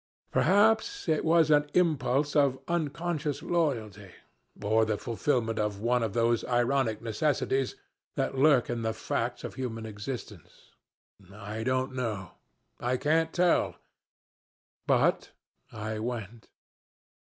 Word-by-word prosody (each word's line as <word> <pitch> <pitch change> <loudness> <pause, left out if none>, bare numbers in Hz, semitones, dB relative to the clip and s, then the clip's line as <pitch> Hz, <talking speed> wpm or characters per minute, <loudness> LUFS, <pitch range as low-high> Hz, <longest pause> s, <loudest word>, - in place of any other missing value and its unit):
Perhaps 220 - +3
it 155 -2 +1
was 160 -1 +4
an 145 0 +4
impulse 145 -5 +2
of 140 -3 +3
unconscious 155 -2 -2
loyalty, 115 - -1 0.5
or 110 +2 +2
the 110 -1 0
fulfillment 115 -2 -1
of 105 -2 -1
one 120 +3 +1
of 110 -2 -2
these 115 0 +2
ironic 120 -2 +1
necessities 135 +2 0 0.4
that - - -1
lurk 135 -2 +4
in 120 -1 -3
the 110 -1 -2
facts - - -3
of - - -5
human 115 -4 -5
existence. 105 - -8 0.6
I 105 +2 -6
don't 130 +1 0
know. 110 -8 -3 0.5
I 125 +1 0
can't 160 +4 +1
tell. 180 -1 +2 1.1
But - - +2 0.4
I 110 0 -4
went. 115 -1 -5
125 Hz, 120 wpm, -29 LUFS, 110-150 Hz, 1.1 s, was